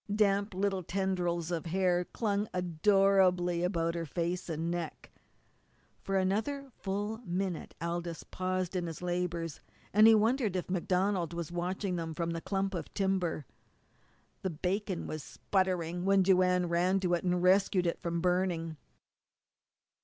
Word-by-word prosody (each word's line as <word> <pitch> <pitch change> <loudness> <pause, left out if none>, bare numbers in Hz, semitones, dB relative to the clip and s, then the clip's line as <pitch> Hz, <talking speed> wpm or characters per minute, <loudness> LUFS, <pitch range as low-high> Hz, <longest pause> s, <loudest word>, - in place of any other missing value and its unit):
Damp 200 -1 +2
little 195 0 0
tendrils 180 -2 -1
of 170 -1 -2
hair 180 0 +2
clung 205 0 -1
adorably 180 0 +3
about 170 -2 0
her 170 -1 -3
face 175 +4 -2
and 165 +1 -2
neck. 170 -2 -5 0.9
For 195 0 -1
another 225 +9 -1
full 205 +3 -3
minute 185 -5 -3
Aldous 170 0 -3
paused 185 0 -2
in 175 -1 -1
his 165 +2 -7
labours, 175 -3 -2 0.3
and 215 +1 +7
he 225 - +8
wondered 220 -1 +2
if 180 0 -3
MacDonald 185 -1 0
was 170 -1 -4
watching 180 +2 -2
them 165 -1 -4
from 170 +1 -1
the 165 0 -3
clump 195 +1 -1
of 175 - -5
timber. 190 -6 0 1.0
The 190 - -1
bacon 185 +3 -2
was 155 - -4
sputtering 180 -1 -1
when 195 0 +4
Joanne 180 -1 +3
ran 180 +3 +2
to 180 -2 +1
it 175 - +1
and 180 -1 +1
rescued 185 0 +4
it 170 - -1
from 170 0 -2
burning. 180 -3 0
180 Hz, 145 wpm, -31 LUFS, 170-195 Hz, 1.0 s, he